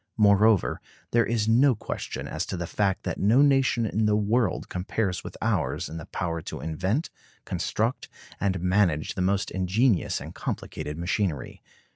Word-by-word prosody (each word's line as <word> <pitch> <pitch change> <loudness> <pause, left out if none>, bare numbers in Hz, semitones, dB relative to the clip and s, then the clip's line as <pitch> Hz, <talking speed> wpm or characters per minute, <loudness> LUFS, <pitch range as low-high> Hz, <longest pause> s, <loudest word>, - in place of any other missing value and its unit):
Moreover, 105 -1 +4 0.3
there 115 0 +3
is 110 -2 0
no 125 +3 +5
question - - -5
as - - -3
to 95 - -4
the 85 - -3
fact 95 +2 0
that - - -3
no 115 +8 +5
nation 135 -4 +3
in 110 0 +1
the 105 - +3
world 105 +1 +1
compares 90 0 -2
with - - -8
ours - - 0
in 80 - -7
the 85 - -8
power 85 -2 -3
to - - -7
invent, 95 - -2 0.3
construct, 115 +4 -2 0.3
and 95 -2 0
manage 90 -4 +2
the 95 - -3
most 95 +2 0
ingenious 95 +3 +1
and - - -8
complicated 75 +1 -5
machinery. 85 -3 -2
100 Hz, 160 wpm, -26 LUFS, 90-115 Hz, 0.3 s, no